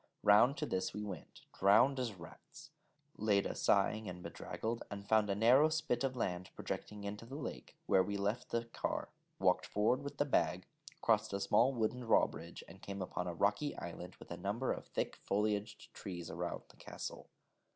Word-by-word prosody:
Round 110 +8 +6
to 155 - -1
this 95 -9 -1
we 105 - -3
went, 95 -7 -8
drowned 120 +8 +5
as 120 -5 -2
rats, 85 -2 -13 0.5
Leda 100 -2 +2
sighing 105 +1 +2
and 90 0 -8
bedraggled, 115 +1 -4
and 100 0 -7
found 110 -2 +4
a 100 - +1
narrow 125 +8 +6
spit 155 -5 0
of 130 -1 0
low 120 - -3
land 90 0 -2
projecting 105 -1 -5
into 100 +2 -5
the 125 +4 -8
lake, 150 - -6
where 95 - +5
we 100 +2 -1
left 100 +5 -1
the 115 0 -1
car, 115 - -3 0.3
walked - - +2
forward 110 +6 +2
with 140 0 -6
the 145 - +2
bag, 90 - +1 0.4
crossed 110 -2 +3
a 100 - 0
small 110 +6 +4
wooden 120 -1 0
drawbridge, 85 -8 +1
and 95 - -13
came 100 0 -6
upon 90 0 -3
a 85 - -3
rocky 105 - +1
island - - -7
with - - -14
a - - -4
number 110 +6 -1
of - - -8
thick - - -3
foliaged 105 0 -1
trees 85 -3 -6
about - - -4
the - - -19
castle. - - -7
105 Hz, 185 wpm, -36 LUFS, 100-120 Hz, 0.5 s, Round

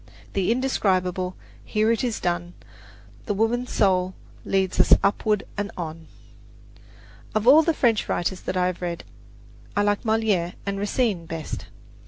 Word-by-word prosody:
The 195 +1 +1
indescribable 185 -7 0 0.3
Here 215 +1 +1
it 230 - 0
is 240 -3 -1
done. 175 0 -2 0.7
The 205 - 0
Woman 235 +4 +1
Soul 185 -4 +1 0.3
leads 190 -1 0
us - - +6
upward 210 +1 +1
and 205 0 -2
on! 160 -2 -6 1.3
Of 215 0 +1
all 295 +5 +9
the 320 0 +1
French 230 -6 +2
writers 180 +2 -1
that 185 - -3
I 180 - +2
have 180 -1 -2
read, 175 -1 -3 0.7
I 205 - +4
like 205 0 +1
Moliere 220 -6 +1
and 200 0 -2
Racine 205 -4 0
best. 165 -1 -6
200 Hz, 145 wpm, -24 LUFS, 180-220 Hz, 1.3 s, all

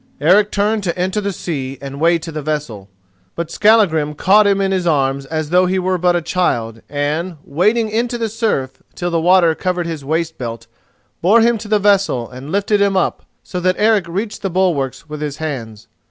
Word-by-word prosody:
Eric 195 +8 +4
turned 210 +1 0
to 170 0 -2
enter 190 +4 -1
the 200 0 -2
sea 140 -7 -5
and 140 0 -8
wade 165 0 +3
to 165 - -6
the 155 -1 -5
vessel, 140 -10 -4 0.5
but 170 -1 -4
Skallagrim 190 -9 +3
caught 205 +6 +4
him 200 -1 +2
in 195 -1 0
his 185 -2 0
arms 135 -3 0
as 155 0 -3
though 180 +1 +4
he 190 +1 0
were 185 0 0
but 175 0 +2
a 175 - -1
child, 115 -12 -1
and, 150 +4 -2
wading 210 +10 +1
into 240 +2 -1
the 230 -1 -1
surf 210 - -2
till 175 0 -3
the 165 -1 +1
water 175 -1 +4
covered 180 +1 -2
his 160 -4 -5
waistbelt, 135 -7 -3 0.6
bore 210 +7 +5
him 235 0 +2
to 210 - -8
the 210 0 +3
vessel 195 - +2
and 130 +5 -10
lifted 200 +1 +1
him 200 -1 +2
up 185 - -1 0.2
so 180 - -5
that 185 +1 +1
Eric 210 -4 +2
reached 200 +6 -4
the 195 - -2
bulwarks 165 -7 -1
with 150 -1 -7
his 150 -1 -4
hands. 120 -9 -6
175 Hz, 200 wpm, -18 LUFS, 150-200 Hz, 0.6 s, bore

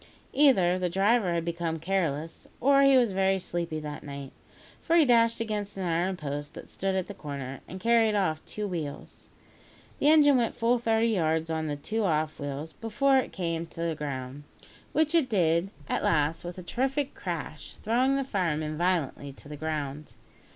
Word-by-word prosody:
Either 190 -11 +4
the 180 -1 0
driver 195 +2 +2
had 170 -1 -1
become 170 -1 -2
careless, 165 -3 -2
or 275 +2 +5
he 275 -1 +6
was 240 -4 +3
very 190 0 +2
sleepy 170 -3 -3
that 150 -1 -6
night, 140 -2 -8 0.5
for 335 - +1
he 330 -3 +6
dashed 230 -2 +4
against 210 -3 -3
an 190 - -3
iron 175 +2 0
post 145 -1 -5
that - - -10
stood 195 0 -1
at 190 -2 0
the 205 - -8
corner, 140 -6 -6
and 185 - -8
carried 230 0 +3
off 160 -6 0
two 210 -1 -5
wheels. 160 -6 -6 0.7
The 290 - +4
engine 290 -3 +6
went 235 -2 0
full 235 +1 +2
thirty 225 0 +2
yards 160 -5 0
on 160 -1 -1
the 145 - -2
two 215 +10 -2
off 155 -4 0
wheels, 145 +2 -5
before 265 - +2
it 255 - -3
came 165 -2 -3
to 165 - -9
the 170 -1 0
ground, 140 -2 -5 0.5
which 310 0 +1
it 320 -6 +3
did 170 -3 +2 0.2
at - - -1
last 155 +1 +1
with 175 +1 -7
a 185 - -7
terrific 270 +7 -1
crash, - - -6
throwing 250 +5 +2
the 275 - 0
firemen 155 - -2
violently 165 -6 0
to 140 - -15
the 150 - -6
ground. 150 -1 -4
180 Hz, 185 wpm, -28 LUFS, 155-230 Hz, 0.7 s, he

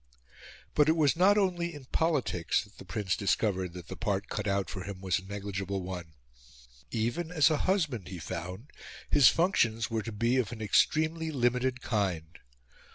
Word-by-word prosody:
But 150 0 +4
it 160 - +4
was 150 -1 +3
not 195 +4 +5
only 175 -4 0
in 145 -3 -10
politics 140 - 0
that 105 0 -19
the - - -10
Prince 105 -5 -1
discovered 95 -3 0
that 90 -1 -9
the - - -7
part 100 -2 -2
cut 105 0 -3
out 100 -2 0
for 95 0 -6
him 100 -1 -7
was 95 -2 0
a 95 - -14
negligible 100 -1 -4
one. 90 -4 -7 0.7
Even 120 +10 -2
as 160 -2 +4
a 155 - +2
husband, 150 - 0
he 90 - -7
found, 90 - -6 0.4
his 140 -5 +7
functions 115 - +1
were 110 -1 0
to 115 +2 -6
be 115 +4 +1
of 120 -6 0
an 120 - -7
extremely 155 +9 +2
limited 125 -2 0
kind. 90 -7 -2
110 Hz, 175 wpm, -30 LUFS, 95-150 Hz, 0.7 s, his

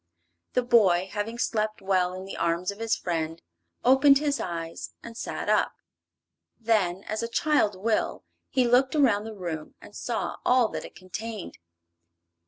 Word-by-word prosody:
The 250 - +2
boy, 195 -7 +4
having 215 +3 -3
slept 215 -2 -1
well 185 -2 +1
in 185 +1 -7
the 195 - -7
arms 170 +3 0
of 200 - -11
his 225 0 +1
friend, 165 -1 -3 0.5
opened 270 +2 +7
his 290 0 0
eyes 165 -2 -5
and 230 -1 -9
sat - - -4
up. - - +2 0.9
Then, 205 -5 +1
as 215 +1 -3
a 230 - -2
child 230 -3 +2
will, 215 +4 -1 0.3
he 255 -2 +2
looked 260 +4 +4
around 230 -8 +3
the 220 -1 -7
room 170 -5 -5
and - - -14
saw - - -3
all 250 -3 +4
that - - -5
it - - -12
contained. 200 +2 -7
215 Hz, 160 wpm, -27 LUFS, 185-235 Hz, 0.9 s, opened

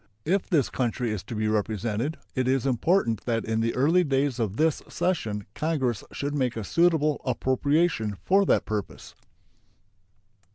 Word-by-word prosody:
If 190 +4 0
this 155 - +2
country 120 -2 -1
is 105 -3 -3
to 115 - -6
be 110 0 0
represented, 110 - -1 0.2
it 130 -1 0
is 130 0 +1
important 130 - +1
that 115 -2 -1
in 110 0 -1
the 115 +1 0
early 160 +8 +4
days 135 -3 0
of 110 -2 -2
this 160 0 +2
session 110 - -1
Congress 130 -8 -1
should 145 +1 -3
make 130 -5 -1
a 110 - -3
suitable 155 - +2
appropriation 130 -2 +1
for 195 +2 +4
that - - +3
purpose. 105 -2 -5
130 Hz, 155 wpm, -26 LUFS, 110-155 Hz, 0.2 s, early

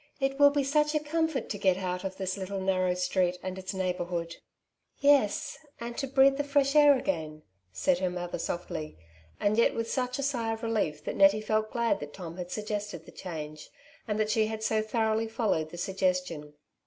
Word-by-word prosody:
It 270 0 -1
will 285 0 +8
be 285 0 0
such 300 +2 +2
a - - +4
comfort 320 -1 -1
to 205 - -4
get 190 -2 +3
out 180 -1 -3
of 190 -1 -4
this 190 -1 -2
little 195 0 -4
narrow 185 -1 +1
street, 180 0 +1
and 185 0 -4
its 185 0 -5
neighbourhood/' 180 -3 -2
'^ - - -7 0.6
Yes! 285 +1 +3 0.2
and 235 0 -5
to 275 - -2
breathe 270 +1 +5
the 290 - 0
fresh 280 0 +2
air 290 -2 +7
again," 155 -8 -3 0.3
said 175 - +1
her 185 -1 0
mother 175 -1 -4
softly, 165 - -4 0.4
and 210 +2 +2
yet 235 - +4
with 230 0 -2
such 250 -1 -1
a 275 - -2
sigh 235 -5 0
of 225 - -7
relief 205 -10 -1
that - - -4
Nettie 195 +2 +6
felt 215 0 0
glad 235 -2 +1
that 145 0 -8
Tom 175 -2 -8
had 180 -1 -5
suggested 210 -5 -4
the - - -12
change, 155 -4 -7 0.4
and 210 -1 -1
that 215 0 +1
she 215 0 +2
had 220 0 -5
so 220 0 +2
thoroughly 220 0 0
followed 220 -9 0
the 175 - -9
suggestion. 180 -5 -1
205 Hz, 205 wpm, -29 LUFS, 180-240 Hz, 0.6 s, will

